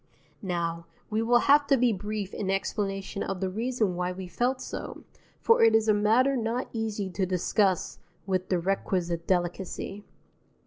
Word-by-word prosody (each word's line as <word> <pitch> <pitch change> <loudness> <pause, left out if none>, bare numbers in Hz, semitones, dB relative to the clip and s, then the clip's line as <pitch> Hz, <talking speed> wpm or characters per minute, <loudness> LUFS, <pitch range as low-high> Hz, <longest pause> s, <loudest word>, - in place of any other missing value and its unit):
Now, 170 -3 -3 0.2
we 215 +1 +1
will 240 +1 +4
have 285 0 +5
to 275 - +4
be 245 -2 +3
brief 205 0 -4
in 195 - -3
explanation 195 0 -2
of 195 -1 -3
the 190 -1 -2
reason 220 -2 -1
why 180 0 -1
we 185 0 -7
felt 250 +7 0
so, - - -7 0.4
for 460 - +4
it 225 -1 +6
is 220 0 +3
a 215 - +5
matter 225 +7 +3
not 235 +1 -1
easy 220 -3 -2
to 185 +1 -1
discuss 185 +1 +1 0.3
with 185 -1 -1
the 185 - +2
requisite 175 -2 -1
delicacy. 185 +2 -2
200 Hz, 165 wpm, -27 LUFS, 185-225 Hz, 0.4 s, it